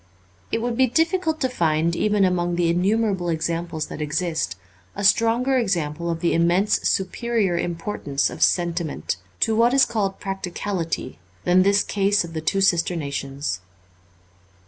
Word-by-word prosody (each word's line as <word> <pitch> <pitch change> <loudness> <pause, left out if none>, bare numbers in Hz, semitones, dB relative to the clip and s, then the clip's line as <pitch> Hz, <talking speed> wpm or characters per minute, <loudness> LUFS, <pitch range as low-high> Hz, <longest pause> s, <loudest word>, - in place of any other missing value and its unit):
It 225 - -1
would 240 -1 -1
be 260 +1 +4
difficult 325 +4 +1
to 260 - +3
find, 165 -7 0
even 205 +1 +2
among 175 -1 0
the 170 -1 +1
innumerable 190 0 +1
examples 165 0 -2
that - - -8
exist, 160 - -1 0.4
a 200 - -4
stronger 230 +6 +3
example 170 -6 -1
of 165 -1 -3
the 170 - +1
immensely 175 +5 +2
superior 200 0 0
im 170 0 -1
portance 150 -6 -2
of - - -9
sentiment, 170 - 0 0.2
to 220 - +3
what 235 +3 +3
is 270 - +6
called 205 -4 -2
practicality, 185 -6 -4 0.2
than 180 +1 +4
this 200 +1 +3
case 200 0 +1
of 165 -1 -9
the 160 - -3
two 195 +5 0
sister 175 -2 +2
nations. 140 - -3
180 Hz, 150 wpm, -23 LUFS, 165-210 Hz, 0.4 s, is